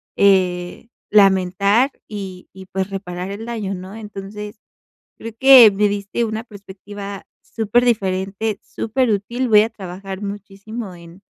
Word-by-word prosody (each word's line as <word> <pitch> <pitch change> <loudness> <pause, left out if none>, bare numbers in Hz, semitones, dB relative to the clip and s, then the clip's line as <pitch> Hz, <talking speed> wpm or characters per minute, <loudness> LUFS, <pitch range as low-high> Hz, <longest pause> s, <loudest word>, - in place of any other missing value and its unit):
eh, 185 0 +2 0.2
lamentar 200 +5 +4 0.2
y 190 -3 -8
y 190 -1 -12
pues 190 +1 -3
reparar 185 -1 -5
el 215 +3 -6
daño, 215 -5 -3
¿no? 190 +3 -8
Entonces 210 0 -8 0.6
creo 230 0 -8
que 260 -4 +9
me 205 +1 +2
diste 205 +3 -2
una 220 +1 -4
perspectiva 200 -1 -9 0.2
superdiferente, 210 -3 0
superútil. 235 +1 -1
Voy 210 -1 +7
a 225 - -2
trabajar 190 -1 -8
muchísimo 200 +1 -7
en 170 +3 -15
200 Hz, 120 wpm, -20 LUFS, 190-220 Hz, 0.6 s, que